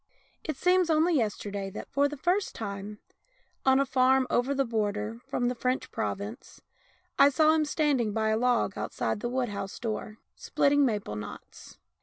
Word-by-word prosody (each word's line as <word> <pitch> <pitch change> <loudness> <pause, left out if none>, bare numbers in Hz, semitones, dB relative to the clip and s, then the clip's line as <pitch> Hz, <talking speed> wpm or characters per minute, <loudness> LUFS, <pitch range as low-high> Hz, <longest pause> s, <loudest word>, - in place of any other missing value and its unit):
It 310 -4 -4
seems 360 +1 +3
only 320 +2 +3
yesterday 205 -5 -2
that, - - -8
for 280 +1 +3
the 295 - -7
first 365 +7 0
time, 205 -1 -6 0.7
on 265 0 +6
a 275 - +3
farm 260 0 +3
" - - -31
over 260 +3 +1
the 275 0 +1
border," 215 -1 -2
from 245 - -1
the 250 - 0
French 255 +1 -2
province, 220 +1 -5 0.6
I 280 - +8
saw 310 +3 +4
him 315 -1 +2
standing 290 -7 +1
by 220 +1 0
a 220 - +2
log 240 -4 +1
outside - - -2
the 240 - -3
wood 250 -1 -1
house 200 -1 -5
door, 215 -1 -4 0.2
splitting 285 -1 +2
maple 205 - -3
knots. 105 -1 -10
245 Hz, 175 wpm, -28 LUFS, 210-280 Hz, 0.7 s, I